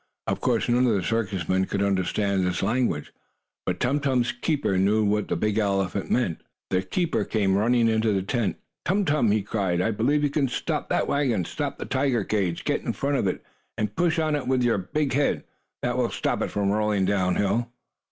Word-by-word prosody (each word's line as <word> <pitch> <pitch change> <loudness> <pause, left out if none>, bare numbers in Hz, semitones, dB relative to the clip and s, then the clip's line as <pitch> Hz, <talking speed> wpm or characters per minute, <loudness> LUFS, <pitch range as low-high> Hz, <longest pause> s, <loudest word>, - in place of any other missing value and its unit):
Of - - -2
course - - +1
none 125 +1 +3
of 115 - +3
the 95 - 0
circus 100 -6 -1
men 95 0 +2
could 100 +1 -1
understand 100 0 +1
this 90 0 -1
language, 110 -7 0 0.5
but 90 -1 -1
Tum 135 +4 +1
Tum's 130 -4 +1
keeper 150 - -1
knew 105 +3 +3
what 105 0 +1
the - - -1
big 105 0 0
elephant 95 -2 0
meant. 105 -10 0 0.3
The 95 -1 +2
keeper 135 - -1
came 100 -3 +1
running 115 +3 +3
in 110 -1 +2
the 105 -4 +1
tent. 115 +1 -1 0.3
"Tum 195 +2 +1
Tum!" 145 -8 +2
he 105 0 +2
cried. 95 -4 -1
"I 95 +5 +1
believe 135 +8 +1
you 145 - +1
can 140 -2 +1
stop 125 - -3
that - - +1
wagon. 125 - +1
Stop - - -4
the - - -5
tiger 130 -4 +1
cage! 95 -5 -1
Get - - 0
in - - -2
front 140 0 0
of 100 - 0
it, 90 - -2 0.3
and 105 -1 -2
push 170 -1 +1
on 155 -2 +1
it 140 -4 -3
with 130 -1 +2
your 120 -4 +2
big 140 +9 -1
head. 140 +1 +1 0.4
That - - 0
will - - +1
stop - - -1
it - - -1
from 100 -1 0
rolling 105 -2 +1
down 95 -2 +1
hill!" 115 +4 0
110 Hz, 210 wpm, -25 LUFS, 95-130 Hz, 0.5 s, none